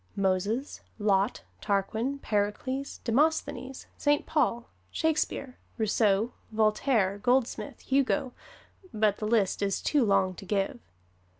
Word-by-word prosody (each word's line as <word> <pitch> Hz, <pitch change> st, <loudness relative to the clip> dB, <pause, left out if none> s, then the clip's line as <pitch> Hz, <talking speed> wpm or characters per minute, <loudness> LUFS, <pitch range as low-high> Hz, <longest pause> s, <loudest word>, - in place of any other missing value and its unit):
Moses, 200 Hz, +7 st, -1 dB, 0.2 s
Lot, 205 Hz, 0 st, +1 dB, 0.2 s
Tarquin, 220 Hz, +7 st, -1 dB
Pericles, 215 Hz, +7 st, -2 dB
Demosthenes, 265 Hz, 0 st, 0 dB
Saint 290 Hz, 0 st, +2 dB
Paul, 245 Hz, -6 st, 0 dB, 0.2 s
Shakespeare, 305 Hz, -5 st, -1 dB, 0.2 s
Rousseau, 215 Hz, 0 st, +2 dB, 0.2 s
Voltaire, 215 Hz, -2 st, +2 dB
Goldsmith, 250 Hz, +2 st, 0 dB
Hugo 275 Hz, -1 st, +1 dB, 0.6 s
but 210 Hz, -1 st, +2 dB
the 215 Hz, -, -3 dB
list 215 Hz, -4 st, +1 dB
is 195 Hz, -1 st, 0 dB
too 290 Hz, -4 st, +2 dB
long 195 Hz, -3 st, +2 dB
to 190 Hz, -, -11 dB
give. 200 Hz, +6 st, -1 dB
225 Hz, 105 wpm, -28 LUFS, 200-265 Hz, 0.6 s, Saint